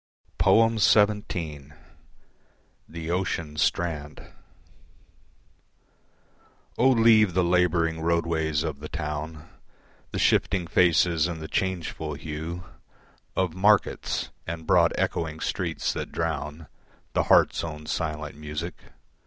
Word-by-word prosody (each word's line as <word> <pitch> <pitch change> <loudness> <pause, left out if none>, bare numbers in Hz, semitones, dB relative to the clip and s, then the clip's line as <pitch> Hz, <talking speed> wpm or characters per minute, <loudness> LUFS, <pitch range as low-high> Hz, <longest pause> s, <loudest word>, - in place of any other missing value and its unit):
XVII. 105 -9 +2 1.2
The 85 0 -5
Ocean 85 -4 -2
Strand 75 -2 -2 2.4
O 130 +3 +4
leave 110 -6 +5
the 90 - +3
labouring 85 -2 +2
roadways 80 -2 0
of 75 -4 -4
the 75 - -8
town, 75 0 -5 0.6
The - - -5
shifting 90 -3 +2
faces 85 -1 +3
and 85 -2 -5
the 80 - -6
changeful 85 -5 -2
hue 80 +4 -6 0.7
Of 90 -4 0
markets, 100 +3 +1 0.2
and 80 -1 -5
broad - - +4
echoing 80 -1 -2
streets 85 -2 -2
that - - -5
drown 80 -1 -3 0.5
The - - +1
heart's - - +4
own 75 -2 -6
silent 75 -2 -3
music. 75 +3 -5
80 Hz, 100 wpm, -26 LUFS, 75-90 Hz, 2.4 s, leave